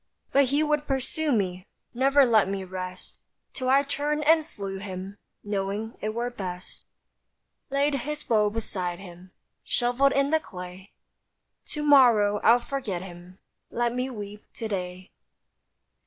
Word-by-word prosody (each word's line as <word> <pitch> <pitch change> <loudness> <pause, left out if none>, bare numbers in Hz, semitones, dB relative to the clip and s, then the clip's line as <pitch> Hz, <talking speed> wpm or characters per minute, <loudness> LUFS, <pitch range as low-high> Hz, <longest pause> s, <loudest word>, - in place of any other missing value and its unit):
But 280 0 +5
he 285 +4 +1
would 300 -1 0
pursue 275 +3 0
me, 185 -4 -1 0.3
Never 275 +3 +5
let 220 -5 +4
me 195 -1 -2
rest; 185 0 -7 0.3
Till 255 -1 -2
I 275 +2 +5
turned 295 +1 -1
and 320 +1 +5
slew 195 - -6
him, 195 0 -7 0.2
Knowing 205 +2 -3
it 215 +1 -3
were 240 +1 -1
best. 185 -5 -7 0.9
Laid 280 +2 +1
his 300 +3 -3
bow 210 -2 +3
beside 185 -5 -3
him, 180 -1 -12 0.3
Shovelled 245 +3 +2
in 275 +1 +2
the 315 - +4
clay; 180 -4 -10 0.8
To 300 - -3
morrow 235 -8 +6
I'll 230 +3 +6
forget 240 -8 -4
him; 180 0 -11 0.3
Let 240 0 0
me 250 +1 -1
weep 210 -3 -8
to 225 - -4
day. 185 -2 -5
220 Hz, 140 wpm, -26 LUFS, 190-275 Hz, 0.9 s, morrow